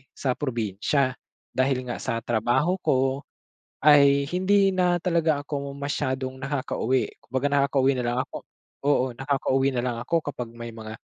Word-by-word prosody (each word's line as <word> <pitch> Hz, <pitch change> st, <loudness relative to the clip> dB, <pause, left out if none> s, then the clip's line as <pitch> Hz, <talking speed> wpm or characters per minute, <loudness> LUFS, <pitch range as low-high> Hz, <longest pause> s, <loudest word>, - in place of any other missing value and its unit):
sa 135 Hz, -, -1 dB
probinsya. 125 Hz, +1 st, 0 dB, 0.4 s
Dahil 130 Hz, 0 st, +1 dB
nga 125 Hz, -1 st, -5 dB
sa 115 Hz, -2 st, -3 dB
trabaho 120 Hz, -, +1 dB
ko, 135 Hz, -3 st, +1 dB, 0.6 s
ay 140 Hz, -1 st, +5 dB
hindi 195 Hz, +3 st, +3 dB
na 180 Hz, -2 st, +2 dB
talaga 165 Hz, -4 st, +1 dB
ako 140 Hz, -1 st, -4 dB
masyadong 130 Hz, -2 st, -2 dB
nakakauwi. 130 Hz, -2 st, -1 dB, 0.2 s
Kumbaga, 130 Hz, +2 st, -1 dB
nakakauwi 140 Hz, -1 st, +2 dB
nalang 120 Hz, 0 st, -1 dB
ako -, -, -6 dB, 0.4 s
oo 130 Hz, -3 st, +3 dB
nakakauwi 135 Hz, 0 st, 0 dB
nalang 120 Hz, -1 st, -1 dB
ako 160 Hz, +8 st, 0 dB
kapag 125 Hz, -3 st, -5 dB
may 115 Hz, 0 st, -7 dB
mga, 110 Hz, -1 st, -8 dB
135 Hz, 135 wpm, -25 LUFS, 125-145 Hz, 0.6 s, ay